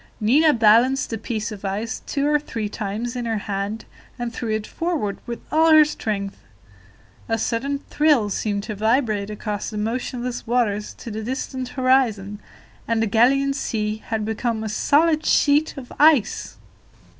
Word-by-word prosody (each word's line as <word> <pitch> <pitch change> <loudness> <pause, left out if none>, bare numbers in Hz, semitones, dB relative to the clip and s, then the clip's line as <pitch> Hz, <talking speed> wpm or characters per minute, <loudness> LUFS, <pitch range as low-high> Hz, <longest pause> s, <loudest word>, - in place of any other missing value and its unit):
Nina 280 +9 +4
balanced 235 +3 +4
the 225 - -2
piece 220 -1 -3
of 205 -2 -9
ice 205 +3 -3
two 280 0 -1
or 295 0 +3
three 225 -7 -4
times 215 +3 -4
in 245 -1 -3
her 225 -1 -1
hand, 205 +1 -4 0.3
and 240 -1 -4
threw 230 0 -4
it 215 -1 -1
forward 320 - -2
with 235 -1 -5
all 320 +1 +4
her 310 -1 +8
strength. 205 -9 -3 0.9
A 225 - +1
sudden 255 +5 -1
thrill 285 -7 +2
seemed 200 0 -2
to 215 - -5
vibrate 215 -1 +1
across 210 -1 -4
the 215 - -6
motionless 240 +3 -3
waters 220 -4 0
to 230 - -8
the 215 +1 -4
distant 260 +2 -4
horizon, 230 -6 +2 0.5
and 230 -1 +1
the 225 - +1
Gallian 270 +6 +3
Sea 215 -5 -2
had 220 -1 -2
become 220 0 -2
a 220 - -3
solid 310 +8 +2
sheet 295 +1 +3
of 255 -2 -9
ice! 290 -7 +3
230 Hz, 160 wpm, -22 LUFS, 210-270 Hz, 0.9 s, her